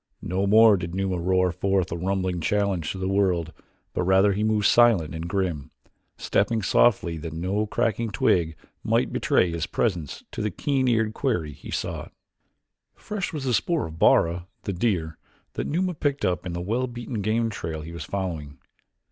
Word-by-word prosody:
No 95 +3 -1
more 110 0 +7
did 85 -1 -5
Numa 95 -2 -1
roar 90 +1 +2
forth 95 0 0
a - - -1
rumbling 90 0 -1
challenge 100 -3 0
to - - -6
the 95 0 -2
world 90 -5 +1 0.4
but - - -1
rather 95 +2 +4
he 105 +2 -1
moved 110 -1 +1
silent 115 -11 +4
and 80 +1 -5
grim, 85 -7 -2 0.5
stepping 110 +1 0
softly 95 -5 +3
that 80 0 -6
no 95 +6 -1
cracking 115 +2 0
twig 85 -4 +1 0.3
might - - +1
betray 90 - +2
his 85 -1 -2
presence 90 - -2
to - - -5
the 105 - 0
keen 135 +1 0
eared 110 -3 +2
quarry 90 - -1
he - - -12
sought. - - -4 0.8
Fresh 210 -5 -4
was 150 -4 -5
the 130 -2 0
spoor 165 +7 +1
of 80 0 -9
Bara, 85 +1 +3 0.2
the 100 - -3
deer, 85 -6 -1 0.3
that - - -3
Numa 180 +4 0
picked 145 -6 -1
up 90 -2 -1
in 90 - -4
the 85 - -3
well 115 +8 -1
beaten 120 -2 -5
game 115 +2 0
trail 80 -6 -5
he 80 +2 -8
was 85 -2 -6
following. 80 -6 -4
95 Hz, 180 wpm, -25 LUFS, 85-110 Hz, 0.8 s, more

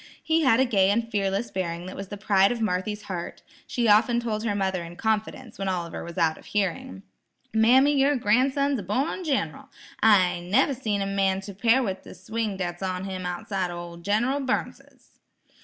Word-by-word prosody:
He 325 0 +2
had 260 -5 +4
a 265 - +4
gay 195 -6 +3
and 230 +3 +1
fearless 205 +1 -1
bearing 175 -2 -3
that 185 - -7
was 195 - -6
the 205 - -7
pride 195 0 +3
of 240 - -3
Marthy's 210 0 -2
heart. 180 -4 -6 0.2
She 240 -3 0
often 220 +3 +4
told 220 -2 -3
her 210 -3 -1
mother 190 -2 -1
in 170 +1 -9
confidence, 220 +3 -2
when 195 -1 -1
Oliver 175 -3 -3
was 170 +2 -9
out 165 -2 +1
of - - -17
hearing: 180 - -2 0.5
"Mammy, 255 +6 +5
yer 280 +2 +3
gran'son's 265 +4 +2
a - - -4
born 260 - -2
gin'ral; 260 - -2 0.3
I 190 -5 +4
never 210 +11 +2
seen 215 -6 -2
any 195 0 -3
man 195 -1 +1
to 200 +1 -8
'pare 230 +7 +3
with 190 -4 -3
the - - -12
swing 215 +2 -3
dat's 175 -1 -4
on 185 -1 -2
him 185 -2 -4
outside 185 0 -3
o' 175 - -6
ol' 170 0 -8
Gin'ral 220 +10 0
Burnsis." 265 -1 -5
205 Hz, 195 wpm, -25 LUFS, 185-235 Hz, 0.5 s, Mammy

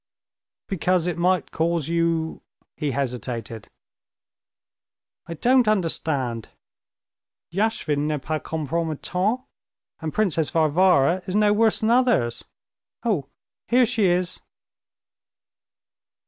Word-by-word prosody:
"Because 180 -2 +1
it 175 -2 -1
might 180 +1 +1
cause 165 -2 0
you...." 165 -1 0 0.3
he 150 - -2
hesitated. 120 -4 -4 1.6
"I 170 - -5
don't 250 +5 +3
understand. 150 - -1 1.0
Yashvin 170 -8 0
n'est 150 -1 -1
pas 155 +2 -2
compromettant, 165 - -2 0.6
and 160 -2 -4
Princess 170 -7 +1
Varvara 165 0 +3
is 185 - -3
no 210 0 +4
worse 220 +1 +3
than 220 +1 +2
others. 235 - +2 0.6
Oh, 195 - 0 0.4
here 250 +1 +4
she 225 -3 +1
is!" 180 0 0
170 Hz, 95 wpm, -23 LUFS, 150-205 Hz, 1.6 s, no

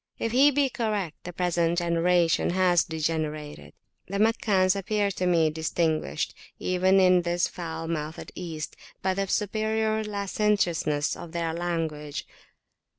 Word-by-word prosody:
If 230 - -2
he 270 +4 +6
be 285 0 +2
correct, 210 - -3
the 180 - -5
present 175 -1 0
generation 170 0 +2
has 180 -1 +3
degenerated. 155 -2 -3 0.3
The 200 - -3
Meccans 205 -3 +3
appeared 200 0 0
to 180 - 0
me 165 -3 +3
distinguished, 160 - -1 0.2
even 185 +1 +3
in 185 -1 +5
this 175 0 0
foul 165 -2 -6
mouthed 160 -1 -4
East, 160 -4 -6 0.3
by 190 0 +2
the 195 +1 -1
superior 220 +2 0
licentiousness 200 -7 0
of 170 -1 -10
their 165 -1 -1
language. 160 -4 -3
175 Hz, 130 wpm, -26 LUFS, 165-200 Hz, 0.3 s, he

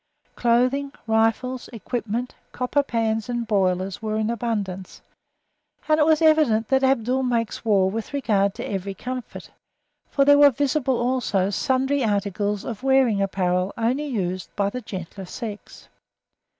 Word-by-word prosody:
Clothing, 255 +4 +1
rifles, 225 +3 0
equipment, 235 +1 -4 0.2
copper 250 +3 +1
pans 225 -4 -1
and 240 -1 -2
boilers 190 -2 0
were 215 -1 -2
in 220 +1 0
abundance, 205 -5 -4 0.9
and 310 0 +3
it 300 - +4
was 315 0 +3
evident 295 -9 +3
that 265 0 +3
Abdul 260 -1 +2
makes 235 -3 -1
war 200 -4 +3
with 215 +3 -4
regard 205 -8 +1
to - - -5
every 195 0 -4
comfort, 255 +1 -7 0.6
for 275 - +2
there 285 0 +6
were 290 0 +9
visible 270 -1 0
also 240 -6 0
sundry 260 +9 +1
articles 205 -1 -1
of 230 -2 -5
wearing 265 -6 +3
apparel 185 -1 0
only 250 +6 0
used 185 -8 -3
by 200 -1 0
the 250 - -5
gentler 190 -2 -7
sex. 210 +2 -8
230 Hz, 140 wpm, -23 LUFS, 200-260 Hz, 0.9 s, were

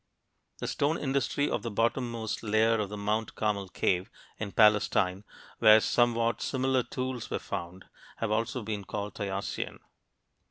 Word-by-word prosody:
The - - -5
stone 150 +3 +1
industry 140 +1 0
of - - -1
the 115 - -4
bottommost 115 0 -1
layer 110 +1 +2
of 105 -2 -2
the 105 - -6
Mount 105 +2 -1
Carmel 100 -3 -1
cave, 90 +3 0 0.3
in 105 -2 -4
Palestine, 105 -3 +3 0.4
where 110 0 +8
somewhat 115 0 +2
similar 130 -1 +1
tools 130 -1 -4
were - - -1
found, 90 +3 -6 0.3
has 115 -2 -2
also 115 +2 -1
been 105 -1 -4
called 105 +2 -5
Tayacian. 100 -1 -4
110 Hz, 145 wpm, -29 LUFS, 105-120 Hz, 0.4 s, where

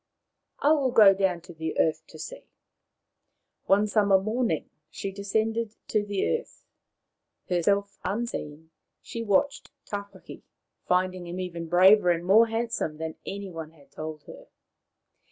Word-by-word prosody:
I 290 - +5
will 285 -4 +3
go 215 -5 +7
down 190 -3 0
to 175 +1 -12
the 160 0 -4
earth 160 - +2
to - - -13
see.,, - - -9 1.2
One 200 +2 +4
summer 205 -2 +3
morning 215 - -1 0.2
she 195 +4 -5
descended 220 +3 -1
to 215 -1 +1
the 205 - 0
earth. 485 - -18 0.8
Herself 200 +3 0
unseen, 160 -8 -4 0.3
she 230 - -6
watched 230 +6 +1 0.2
Tawhaki, 200 -2 -8 0.5
finding 185 0 0
him 175 +2 -5
even 170 -2 -5
braver 185 +2 +6
and 170 0 +1
more 220 +5 +6
handsome 225 -8 -2
than 160 0 -4
any 200 -1 -5
one 160 -1 -8
had 145 -3 -22
told 155 -1 -7
her. - - -13
195 Hz, 135 wpm, -27 LUFS, 170-215 Hz, 1.2 s, go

